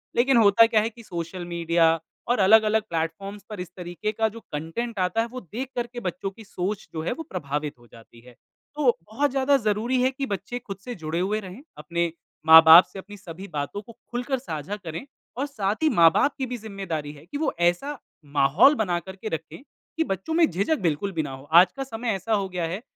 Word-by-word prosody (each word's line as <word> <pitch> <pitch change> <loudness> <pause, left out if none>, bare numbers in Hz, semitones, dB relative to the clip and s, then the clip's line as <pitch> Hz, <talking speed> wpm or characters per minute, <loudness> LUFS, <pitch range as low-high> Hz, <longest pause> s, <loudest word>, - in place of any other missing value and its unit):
लेकिन 250 +1 +4
होता 220 +1 +7
क्या 225 -2 +3
है 225 - -1
कि 235 0 -15
सोशल 175 -1 -6
मीडिया 170 -1 +2 0.3
और 245 -2 +1
अलग-अलग 215 +2 +5
प्लेटफ़ॉर्म्स 170 +5 -4
पर 210 -4 -7
इस 180 - -6
तरीके 180 +4 -4
का 220 +1 +1
जो 230 +2 -10
कंटेंट 195 +9 -4
आता 185 +5 +1
है, 230 - -2
वो 255 +2 -8
देख 235 - -6
कर 240 -1 -2
के 240 0 -8
बच्चों 190 -2 -4
की 220 - -14
सोच 195 +1 -4
जो 160 - -3
है - - -2
वो 325 - -7
प्रभावित 150 -4 -4
हो 120 - -19
जाती 115 0 -17
है। 125 0 -17 0.4
तो 280 -5 +2
बहुत 280 +4 +1
ज़्यादा 275 +1 +3
ज़रूरी 230 +2 0
है 260 - +3
कि 275 +1 -4
बच्चे 205 +2 -4
खुद 200 -5 -8
से 245 - -5
जुड़े 160 -1 -3
हुए 200 +4 0
रहें, 195 +3 -10 0.2
अपने 170 0 -2 0.3
माँ-बाप 160 +2 +10
से 195 - -7
अपनी 205 +1 -11
सभी 185 +1 -9
बातों 150 +8 -3
को 230 - -14 0.2
खुलकर 250 +2 -2
साझा 165 - -5
करें 175 +2 -7 0.3
और 275 - 0
साथ 210 -8 -2
ही 315 - +5
माँ-बाप 170 - +4
की 265 - -2
भी 250 0 -5
ज़िम्मेदारी 195 -9 -5
है 145 +1 -15
कि 180 - -6
वो 315 - -1
ऐसा 175 +13 +1 0.3
माहौल 145 - +4
बना 180 -8 0
कर 190 +2 -10
के 205 - -8
रखें, 160 +7 -6 0.4
कि 325 - +3
बच्चों 195 - -3
में 330 0 +5
झिझक 200 - 0
बिल्कुल 170 +4 0
भी 165 -4 -1
ना 140 - -6
हो। 135 0 -9
आज 180 +2 +8
का 270 - -2
समय 235 -2 -5
ऐसा 195 +4 -2
हो 200 -2 +1
गया 180 -2 -2
है 185 +6 -4
195 Hz, 220 wpm, -25 LUFS, 170-235 Hz, 0.4 s, माँ-बाप